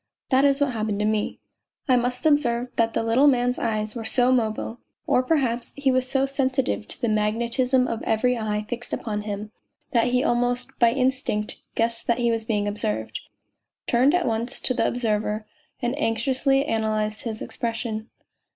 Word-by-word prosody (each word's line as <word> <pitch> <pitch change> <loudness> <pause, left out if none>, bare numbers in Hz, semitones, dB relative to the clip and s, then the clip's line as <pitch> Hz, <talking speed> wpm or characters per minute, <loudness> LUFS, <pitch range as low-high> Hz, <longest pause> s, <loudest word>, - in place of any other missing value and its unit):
That 265 +2 +5
is 275 0 +3
what 285 -2 +2
happened 215 -2 -1
to - - +1
me. 215 -1 -1 0.5
I 255 - +5
must 250 +3 -1
observe 250 -5 +2
that 230 -1 +1
the - - +1
little 235 +6 +4
man's 250 -2 +2
eyes 215 -2 -1
were 230 - -4
so 250 +2 +2
mobile, 225 -1 -1 0.3
or - - +3
perhaps 255 -4 0
he 275 -2 +2
was 255 0 +1
so 270 0 +2
sensitive 265 -4 0
to - - -8
the 240 - 0
mag 215 0 +1
netism 250 +2 +2
of 230 -1 -3
every 250 +3 +1
eye 210 -2 -2
fixed 240 +1 -6
upon 210 -2 -2
him, 210 0 -5 0.4
that 235 -1 +3
he 250 +1 +2
almost 245 -1 0
by 235 -1 +5
instinct 255 -4 -1 0.2
guessed 230 0 0
that 235 - +2
he 240 -1 +2
was 225 -1 -1
being 210 -2 0
observed, 110 - -2 0.7
turned 255 +7 +3
at 360 - +1
once 230 +1 -1
to 255 - +4
the - - +1
observer 215 -2 -1 0.4
and 240 +1 +1
anxiously 270 +4 +1
analysed 215 -2 -1
his 220 -2 -4
expression. 230 -1 -4
235 Hz, 180 wpm, -24 LUFS, 220-255 Hz, 0.7 s, That